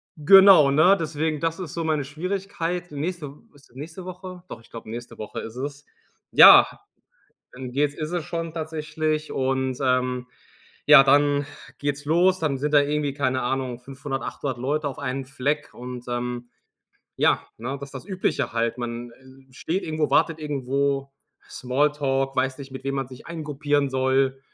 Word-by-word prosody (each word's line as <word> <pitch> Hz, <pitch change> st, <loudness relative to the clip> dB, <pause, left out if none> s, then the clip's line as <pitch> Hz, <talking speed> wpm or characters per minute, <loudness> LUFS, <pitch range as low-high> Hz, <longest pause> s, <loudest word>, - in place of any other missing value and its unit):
genau, 180 Hz, -2 st, +7 dB
ne? 170 Hz, +7 st, +5 dB
Deswegen, 155 Hz, -1 st, -2 dB
das 165 Hz, +2 st, -1 dB
ist 175 Hz, -5 st, -6 dB
so 165 Hz, -, -3 dB
meine 155 Hz, -3 st, 0 dB
Schwierigkeit. 180 Hz, +1 st, -4 dB
Nächste 155 Hz, +1 st, -4 dB
W -, -, -21 dB
ist 140 Hz, -1 st, -21 dB
es 120 Hz, -, -26 dB
nächste 160 Hz, +6 st, -8 dB
Woche? 185 Hz, 0 st, -9 dB
Doch, 115 Hz, -, -9 dB
ich -, -, -22 dB
glaube, 115 Hz, -1 st, -9 dB
nächste 120 Hz, +1 st, -8 dB
Woche 105 Hz, -, -6 dB
ist 115 Hz, +2 st, -9 dB
es. 145 Hz, +2 st, -6 dB, 0.5 s
Ja, -, -, +10 dB, 0.9 s
dann 125 Hz, 0 st, -7 dB
geht's 145 Hz, +2 st, 0 dB
ist 155 Hz, +1 st, -5 dB
es 175 Hz, -3 st, -2 dB
schon 165 Hz, -1 st, -4 dB
tatsächlich. 155 Hz, -1 st, -3 dB
Und, 130 Hz, -1 st, -1 dB
ähm, 125 Hz, -1 st, 0 dB, 0.6 s
ja, 145 Hz, -2 st, +9 dB
dann 145 Hz, +1 st, +3 dB, 0.3 s
geht's 145 Hz, 0 st, -3 dB
los, 180 Hz, +5 st, +3 dB
dann 140 Hz, -4 st, 0 dB
sind 150 Hz, +2 st, -2 dB
da 145 Hz, -, +8 dB
irgendwie, 145 Hz, 0 st, -1 dB
keine 130 Hz, -3 st, 0 dB
Ahnung, 130 Hz, -1 st, -2 dB
500, 135 Hz, +1 st, -6 dB
800 130 Hz, -4 st, -4 dB
Leute 145 Hz, +4 st, -1 dB
auf 135 Hz, -, -8 dB
einen 135 Hz, -1 st, -3 dB
Fleck. 145 Hz, +3 st, -2 dB
Und, 125 Hz, 0 st, -8 dB
ähm, 120 Hz, 0 st, -4 dB, 0.7 s
ja, -, -, +2 dB
ne? 130 Hz, +5 st, -4 dB
Das 140 Hz, 0 st, -8 dB
ist -, -, -18 dB
das 130 Hz, -, -7 dB
Übliche 190 Hz, -, -1 dB
halt. 115 Hz, 0 st, -1 dB
Man, 120 Hz, 0 st, -5 dB
äh, 130 Hz, +1 st, -19 dB
steht 170 Hz, +9 st, -3 dB
irgendwo, 155 Hz, -1 st, -1 dB
wartet 165 Hz, -1 st, +2 dB
irgendwo, 140 Hz, -1 st, -1 dB, 0.4 s
Smalltalk, 135 Hz, 0 st, 0 dB
weiß 130 Hz, 0 st, 0 dB
nicht, 135 Hz, -1 st, -10 dB
mit 130 Hz, -, -8 dB
wem 135 Hz, 0 st, -2 dB
man 135 Hz, -2 st, -2 dB
sich 130 Hz, -1 st, -13 dB
eingruppieren 145 Hz, -3 st, -1 dB
soll 130 Hz, 0 st, +1 dB
140 Hz, 170 wpm, -24 LUFS, 130-155 Hz, 0.9 s, Ja